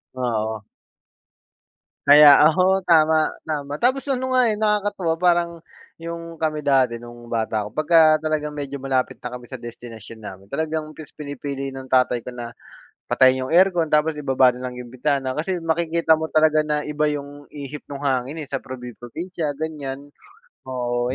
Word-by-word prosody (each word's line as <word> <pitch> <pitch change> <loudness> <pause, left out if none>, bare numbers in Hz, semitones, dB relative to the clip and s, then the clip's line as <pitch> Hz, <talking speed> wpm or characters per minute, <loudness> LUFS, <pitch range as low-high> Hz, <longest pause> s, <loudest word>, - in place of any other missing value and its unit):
Ah, - - -9 0.3
oo. 110 -1 -5 1.4
Kaya 145 0 +9
ako, 185 +4 +3
tama, 160 -2 +4 0.2
tama. 145 -1 -4
Tapos 260 +3 +2
ano 260 0 -1
nga 250 -3 +4
eh, 210 - -3
nakakatuwa, 205 -5 0
parang 170 -1 +1 0.3
'yung 165 0 -7
kami 155 -1 -2
dati 130 -5 +2
nung 120 0 -12
bata 110 -2 -1
ako, 105 - -7
pagka 155 +2 +4
talagang 155 -1 -2
medyo 140 -1 -6
malapit 130 -2 -2
na 125 - -5
kami 125 -1 -9
sa 130 - -8
destinasyon 115 -2 -10
namin, 95 -2 -10
talagang 155 -1 -3
mas 155 -2 -13
pinipili 140 -2 -5
ng 135 0 -9
tatay 125 -1 +2
ko 125 +1 -9
na 120 -1 -6 0.6
patayin 130 +1 +3
'yung 160 - -4
aircon, 175 -2 +4
tapos 150 0 +1
ibaba 135 -3 +3
na 125 +1 -6
lang 125 - -8
'yung 125 -1 -9
bintana, 135 0 -1
kasi 170 +5 -3
makikita 165 0 +2
mo 160 - -2
talaga 155 0 +3
na 150 -1 -1
iba 150 0 -1
'yung 145 -1 -5
ihip 145 0 -8
nung 140 0 -7
hangin 135 +3 -1
eh, - - -10
sa 135 - -1
probi-probinsya, 130 - -6
ganiyan. 145 -2 -6 0.6
Oo, 125 -1 -2
145 Hz, 165 wpm, -22 LUFS, 130-160 Hz, 1.4 s, Kaya